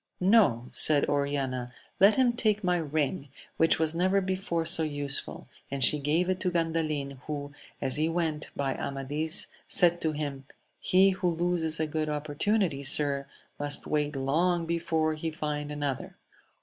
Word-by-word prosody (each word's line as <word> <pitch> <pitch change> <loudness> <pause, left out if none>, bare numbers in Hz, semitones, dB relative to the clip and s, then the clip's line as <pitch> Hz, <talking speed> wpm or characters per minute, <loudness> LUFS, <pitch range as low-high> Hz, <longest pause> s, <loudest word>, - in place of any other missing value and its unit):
No: 180 - +3
said 150 -2 +6
Oriana, 140 -3 -2 0.3
let 200 +3 +6
him 255 -2 +3
take 215 -3 0
my 180 -1 +1
ring, 150 -1 -2 0.3
which 165 - +3
was 160 0 0
never 185 +3 +1
before 185 -3 -2
so 165 - +4
useful: 145 -3 -3 0.2
and 140 -1 -1
she 150 +4 +6
gave 155 +5 0
it 185 0 -1
to 185 - -1
Gandalin, 155 -5 -2
who, 145 -1 -5 0.3
as 135 0 0
he 155 +2 0
went 165 -3 -2
by 135 -1 -1
Amadis, 145 +3 +1 0.2
said 175 -1 +3
to 160 -1 -1
him, 145 -3 -5 0.3
He 195 +1 +4
who 185 -1 -1
loses 170 -1 -1
a 160 - +1
good 155 0 -3
opportunity, 150 +3 -1
sir, 140 0 +2 0.3
must 145 0 -3
wait 150 -1 -1
long 165 +6 0
before 160 -1 -1
he 155 +1 -4
find 150 -1 -4
another. 145 -3 -4
155 Hz, 155 wpm, -28 LUFS, 145-175 Hz, 0.3 s, said